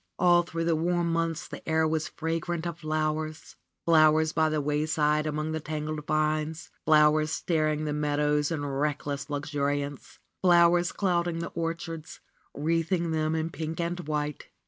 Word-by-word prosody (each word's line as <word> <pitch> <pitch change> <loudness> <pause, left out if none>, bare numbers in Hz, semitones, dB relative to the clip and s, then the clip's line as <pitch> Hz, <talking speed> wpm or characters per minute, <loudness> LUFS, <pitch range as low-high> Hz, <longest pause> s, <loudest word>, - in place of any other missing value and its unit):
All 175 -1 +5
through 165 -1 -4
the 165 -1 +2
warm 170 +1 0
months 165 -3 -1
the - - -8
air 160 0 +3
was 155 0 -1
fragrant 165 +1 -3
of 170 -1 -4
flowers; 155 0 -2 0.3
flowers 155 -1 +5
by 160 -1 +2
the 155 0 0
wayside 150 +1 +1
among 155 +1 -2
the 160 - -2
tangled 155 0 -4
vines; 155 +1 -1
flowers 155 0 +5
starring 155 -3 0
the 150 - -1
meadows 150 0 +1
in 155 -4 -2
reckless 145 0 -2
luxuri 145 -1 -1
ance; 145 -1 -11 0.2
flowers 175 -1 +5
clouding 175 -3 0
the 170 0 -4
orchards, 165 0 -5 0.4
wreathing 165 +3 0
them 155 0 0
in 160 +1 -2
pink 160 0 -5
and 170 +1 -2
white. 150 -1 -3
155 Hz, 150 wpm, -28 LUFS, 150-165 Hz, 0.4 s, All